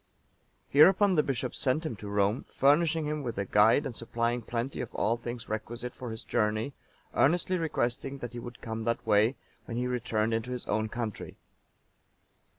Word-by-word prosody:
Hereupon 190 Hz, +7 st, +6 dB
the 155 Hz, -, +4 dB
bishop 130 Hz, -3 st, -2 dB
sent 140 Hz, +5 st, 0 dB
him 140 Hz, -, -3 dB
to 100 Hz, +1 st, -7 dB
Rome, 100 Hz, +3 st, +1 dB
furnishing 155 Hz, +3 st, +2 dB
him 150 Hz, 0 st, -2 dB
with 120 Hz, -6 st, -4 dB
a 100 Hz, -, -1 dB
guide 105 Hz, +9 st, +4 dB
and 130 Hz, -4 st, -4 dB
supplying 115 Hz, +1 st, -1 dB
plenty 120 Hz, +4 st, -3 dB
of 120 Hz, -, -5 dB
all 115 Hz, +3 st, +2 dB
things 120 Hz, 0 st, -6 dB
requisite 115 Hz, +3 st, -4 dB
for 125 Hz, -, -7 dB
his 110 Hz, 0 st, -6 dB
journey, 110 Hz, +3 st, 0 dB, 0.4 s
earnestly 175 Hz, +4 st, +2 dB
requesting 135 Hz, -3 st, -1 dB
that 120 Hz, -3 st, -6 dB
he 120 Hz, -, -5 dB
would 120 Hz, 0 st, -9 dB
come 110 Hz, 0 st, -4 dB
that 115 Hz, 0 st, -1 dB
way, 105 Hz, +5 st, +4 dB, 0.3 s
when 115 Hz, -, -5 dB
he 125 Hz, -, 0 dB
returned 115 Hz, -3 st, 0 dB
into 115 Hz, +2 st, -1 dB
his 125 Hz, -1 st, -4 dB
own 110 Hz, +1 st, 0 dB
country. 115 Hz, -3 st, -5 dB
120 Hz, 175 wpm, -29 LUFS, 110-140 Hz, 0.4 s, Hereupon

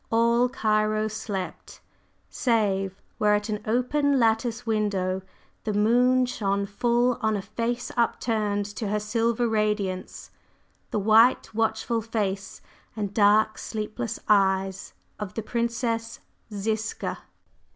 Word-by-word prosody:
All 235 Hz, +2 st, +3 dB
Cairo 215 Hz, -2 st, +1 dB
slept, 205 Hz, -3 st, -6 dB, 0.5 s
save 195 Hz, -5 st, 0 dB, 0.2 s
where 210 Hz, -1 st, +4 dB
at 210 Hz, +1 st, -2 dB
an 210 Hz, -1 st, -2 dB
open 275 Hz, +5 st, +2 dB
lattice 230 Hz, +1 st, +1 dB
window 200 Hz, -4 st, 0 dB, 0.4 s
the 215 Hz, -2 st, -2 dB
moon 250 Hz, +4 st, +4 dB
shone 200 Hz, -5 st, -1 dB
full 240 Hz, +4 st, +1 dB
on 220 Hz, -1 st, +1 dB
a -, -, -3 dB
face 230 Hz, +4 st, -3 dB
up 235 Hz, -1 st, +1 dB
turned 210 Hz, -3 st, 0 dB
to 215 Hz, -, -2 dB
her 210 Hz, +1 st, 0 dB
silver 230 Hz, +2 st, 0 dB
radiance, 210 Hz, -4 st, -2 dB, 0.6 s
the -, -, -2 dB
white, 220 Hz, +4 st, +4 dB
watchful 225 Hz, +1 st, 0 dB
face, 205 Hz, -3 st, -3 dB, 0.3 s
and 205 Hz, -2 st, -3 dB
dark, 215 Hz, +1 st, +4 dB
sleepless 215 Hz, +1 st, -4 dB
eyes 195 Hz, -2 st, +2 dB, 0.3 s
of 210 Hz, -3 st, -6 dB
the 225 Hz, -, -3 dB
Princess 230 Hz, 0 st, -2 dB, 0.3 s
Ziska. 215 Hz, +2 st, -3 dB
215 Hz, 120 wpm, -26 LUFS, 205-230 Hz, 0.6 s, where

